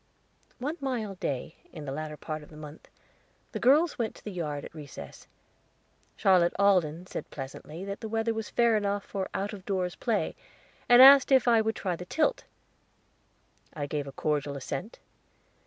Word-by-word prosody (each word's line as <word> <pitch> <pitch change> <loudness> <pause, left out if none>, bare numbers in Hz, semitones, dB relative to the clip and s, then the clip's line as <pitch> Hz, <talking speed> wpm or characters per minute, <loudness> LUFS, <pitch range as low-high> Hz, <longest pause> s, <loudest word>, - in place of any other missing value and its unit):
One 290 +6 -3
mild 225 -8 -3
day, 140 +3 -3
in 155 -2 -8
the 135 - -4
latter 150 +1 -5
part 155 0 -5
of 150 - -14
the 150 - -13
month, 150 0 -11 0.6
the - - -4
girls 295 +6 +4
went 225 -2 -2
to - - -16
the 210 - -6
yard 150 -6 -4
at - - -11
recess. 150 -4 -10 0.9
Charlotte 180 -3 +4
Alden 180 -4 +2
said - - -7
pleasantly 150 +5 -8
that 200 0 -5
the 220 - -5
weather 225 +1 0
was 225 -1 -4
fair 235 -2 +3
enough 205 -1 -1
for 195 -2 -4
out 200 +2 -2
of 195 -2 -9
doors 185 -3 -1
play, 230 -3 -1 0.5
and 245 +1 +9
asked 275 0 +9
if 260 -2 +5
I 230 -2 +5
would 220 0 -1
try 185 -3 -2
the 180 - -8
tilt. 320 - 0 1.3
I 145 -2 -3
gave 145 0 -3
a - - -6
cordial 145 0 -2
assent. 140 - -5
190 Hz, 175 wpm, -28 LUFS, 155-225 Hz, 1.3 s, and